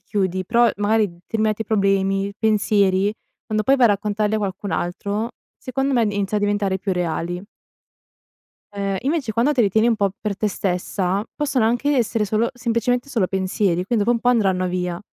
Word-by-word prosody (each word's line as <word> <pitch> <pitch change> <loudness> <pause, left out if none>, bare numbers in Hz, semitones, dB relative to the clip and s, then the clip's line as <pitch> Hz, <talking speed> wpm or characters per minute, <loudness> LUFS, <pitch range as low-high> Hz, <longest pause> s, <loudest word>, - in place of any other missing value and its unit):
chiudi, 185 -2 -2
però 235 +5 +4
magari 210 +1 +2
determinati 215 +5 -2
problemi, 195 -1 +1
pensieri, 205 -2 +2 0.3
quando 215 0 0
poi 270 +4 +4
vai 250 -3 +5
a - - +3
raccontarli 210 +1 0
a - - 0
qualcun 200 -1 -4
altro, 200 +6 -2 0.3
secondo 270 +2 -2
me, 240 - +3
inizia 205 0 -1
a - - -5
diventare 205 -2 0
più 195 +1 -2
reali. 175 0 -2 1.3
Ehm, 200 -1 -2
invece 275 -3 -1
quando 235 +7 +2
te 255 -5 +3
li 205 - +3
tieni 220 +4 +3
un 230 - +2
po' 200 -2 +1
per 205 -3 -3
te 215 - -1
stessa, 190 +1 -1
possono 270 -5 0
anche 245 +6 +1
essere 225 -3 +1
solo 215 +3 0
semplicemente 245 +2 -1
solo 230 -9 +1
pensieri, 190 -1 0
quindi 210 +1 +1
dopo 240 - +3
un 235 - -1
po' 245 - +1
andranno 190 -6 +2
via. 180 -1 -2
205 Hz, 180 wpm, -21 LUFS, 195-230 Hz, 1.3 s, vai